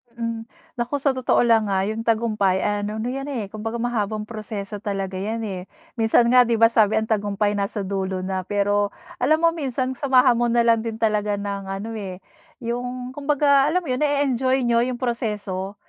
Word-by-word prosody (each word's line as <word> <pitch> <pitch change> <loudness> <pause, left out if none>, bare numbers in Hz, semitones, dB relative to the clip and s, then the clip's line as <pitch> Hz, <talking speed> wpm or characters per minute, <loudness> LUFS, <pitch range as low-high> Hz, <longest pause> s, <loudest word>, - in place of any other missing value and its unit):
Mm, 230 -1 -4 0.3
naku 240 +4 -1
sa 280 - +4
totoo 255 -2 +2
lang 225 -3 +3
ah, 190 -1 +1
yung 215 +3 -2
tagumpay 215 -5 +1
ay 205 0 0
ano 210 - -4
yan 270 +3 -3
eh, 230 -9 -4
kumbaga 225 +1 -5
mahabang 220 -3 -1
proseso 215 -2 -6
talaga 195 -2 -3
yan, 220 +4 -3
eh. 190 -3 -5 0.3
Minsan 230 +1 +4
nga 250 -1 +6
di 235 - +2
ba 230 +1 +5
sabi 215 -2 +4
ang 220 0 0
tagumpay 205 -1 +1
nasa 200 +1 -2
dulo 190 -1 -3
na. 185 -1 -3
Pero 205 0 +1 0.3
alam 310 +6 +2
mo 335 - +5
minsan 260 -5 -2
samahan 260 -2 +3
mo 240 - +2
nalang 235 -1 +3
din 225 0 -4
talaga 210 -2 0
ng 200 -1 -4
ano 195 +4 -5
eh, 190 -3 -7 0.4
yung 245 +2 -4
kumbaga 285 0 +3
alam 360 +4 +1
mo - - -9
yun 255 - -1
nae-enjoy 270 -3 +1
niyo 235 -1 +3
yung 255 -1 -3
proseso. 210 -5 -2
225 Hz, 185 wpm, -23 LUFS, 205-250 Hz, 0.4 s, nga